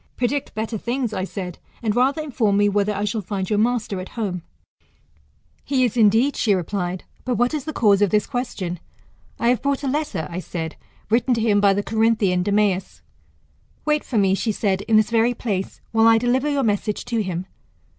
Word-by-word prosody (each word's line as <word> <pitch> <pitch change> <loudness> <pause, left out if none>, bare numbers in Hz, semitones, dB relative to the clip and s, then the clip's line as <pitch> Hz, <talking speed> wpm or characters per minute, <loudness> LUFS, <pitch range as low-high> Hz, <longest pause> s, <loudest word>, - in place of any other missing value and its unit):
Predict 255 +2 -1
better 220 0 -3
things, 240 0 -2
I 185 - -2
said, 185 -3 -6 0.2
and 215 -2 0
rather 270 +5 +2
inform 230 -9 +1
me, 205 0 +4
whether 205 +1 +1
I 205 0 -2
shall 210 +1 -1
find 190 -1 -3
your 210 +1 +1
master 220 -4 0
at 185 - -7
home? 190 -6 -2 1.2
He 265 -2 +1
is 240 - -2
indeed, 230 +5 +4
she 210 -4 +2
replied; 180 0 -3 0.2
but 250 -1 -1
what 245 +3 +1
is 300 -2 -3
the 310 - -3
cause 205 -7 +3
of 205 - +4
this 210 +1 +2
question? 195 -8 -4 0.6
I 235 - +1
have 245 - +2
brought 280 0 -1
a - - -1
letter, 285 - -1
I 170 - -3
said, 165 -3 -5 0.4
written 245 +2 +3
to 230 - -1
him 210 -2 +3
by 200 -1 +4
the 205 - -1
Corinthian 220 -5 +2
Demeas. 200 -1 0 0.8
Wait 300 -1 +1
for 240 - -3
me, 195 -2 +3
she 220 +3 0
said, 195 -2 0
in 220 -1 +5
this 215 0 +2
very 235 +1 +3
place, 200 -5 -3
while 225 0 +4
I 225 0 +6
deliver 250 +5 +1
your 285 -2 +1
message 210 -1 -1
to 230 -2 -1
him. 185 -2 -3
215 Hz, 200 wpm, -22 LUFS, 195-245 Hz, 1.2 s, I